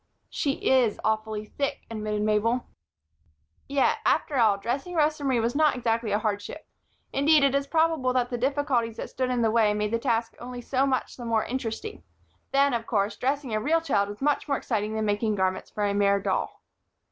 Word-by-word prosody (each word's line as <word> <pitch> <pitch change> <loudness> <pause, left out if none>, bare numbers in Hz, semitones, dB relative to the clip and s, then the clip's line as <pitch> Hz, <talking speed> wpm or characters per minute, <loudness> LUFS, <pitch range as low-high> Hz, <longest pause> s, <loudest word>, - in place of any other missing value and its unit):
"She 280 - 0
is 250 -5 +3
awfully 220 -1 -1
thick," 280 +5 -3
admitted 210 -1 -2
Mabel. 215 +3 +1 1.0
Yet, 275 -1 +2
after 295 - +1
all, 220 -4 +4
dressing 270 - -3
Rosa 305 -1 +1
Marie 260 -3 +2
was 230 +3 -1
not 305 -2 +3
exactly 230 -3 -1
a 205 - +3
hardship. 210 +7 -3 0.5
Indeed, 295 +1 +4
it 275 -1 +3
is 280 0 0
probable 320 -5 +2
that 250 -1 0
the 245 - -1
difficulties 260 -4 0
that - - -6
stood 255 -1 -1
in 245 -2 0
the 220 - +3
way 215 -2 +3
made 210 0 -1
the 230 - +1
task 230 0 0
only 245 0 -7
so 260 +3 0
much 260 -2 -2
the 245 - -8
more 225 -2 +1
interesting; 230 - -4 0.5
then, 275 0 +3
of 230 -1 -2
course, 205 -1 0
dressing 270 -2 -2
a 215 - +1
real 320 +7 +2
child 200 -11 0
was 205 +3 -9
much 295 +1 +1
more 280 -2 +1
exciting 215 -2 -2
than 220 0 -1
making 210 +1 0
garments 190 -1 -1
for 210 - -2
a 200 - 0
mere 200 0 +3
doll. - - -2
235 Hz, 195 wpm, -26 LUFS, 215-275 Hz, 1.0 s, all